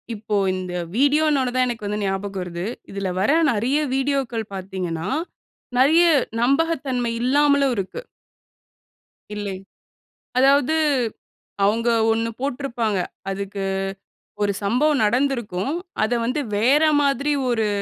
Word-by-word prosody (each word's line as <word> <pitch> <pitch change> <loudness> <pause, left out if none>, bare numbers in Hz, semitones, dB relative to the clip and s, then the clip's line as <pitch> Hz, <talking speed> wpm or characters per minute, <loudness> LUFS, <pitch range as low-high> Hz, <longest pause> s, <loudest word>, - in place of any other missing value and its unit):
இப்போ 210 0 -3 0.2
இந்த 185 -1 -5 0.2
வீடியோன்னோன 285 -1 +3
தான் 255 0 +3
எனக்கு 230 -3 -4
வந்து 210 +1 -2
ஞாபகம் 195 0 -2
வருது. 175 +1 -5 0.3
இதில 195 -1 -3
வர 200 - +2 0.2
நெறைய 240 +6 +1 0.2
வீடியோக்கள் 265 -5 -1
பாத்தீங்கன்னா, 185 -4 -4 0.7
நெறைய 310 +7 +5 0.4
நம்பகத்தன்மை 270 -3 +1
இல்லாமலும் 280 +1 +3
இருக்கு. 195 - -4 1.3
இல்லை. 205 -2 -4 0.8
அதாவது 275 +3 +4 0.9
அவுங்க 225 +4 +2 0.2
ஒண்ணு 225 +1 0
போட்டுருப்பாங்க. 245 -6 -1 0.3
அதுக்கு 200 0 -4 0.8
ஒரு 200 0 +1
சம்பவம் 265 +6 +2
நடந்திருக்கும். 240 -3 0 0.3
அத 220 - 0
வந்து 255 +5 -1 0.2
வேற 265 +8 +4 0.2
மாதிரி 280 +1 +1 0.2
ஒரு 225 -3 +1
240 Hz, 105 wpm, -22 LUFS, 200-275 Hz, 1.3 s, நெறைய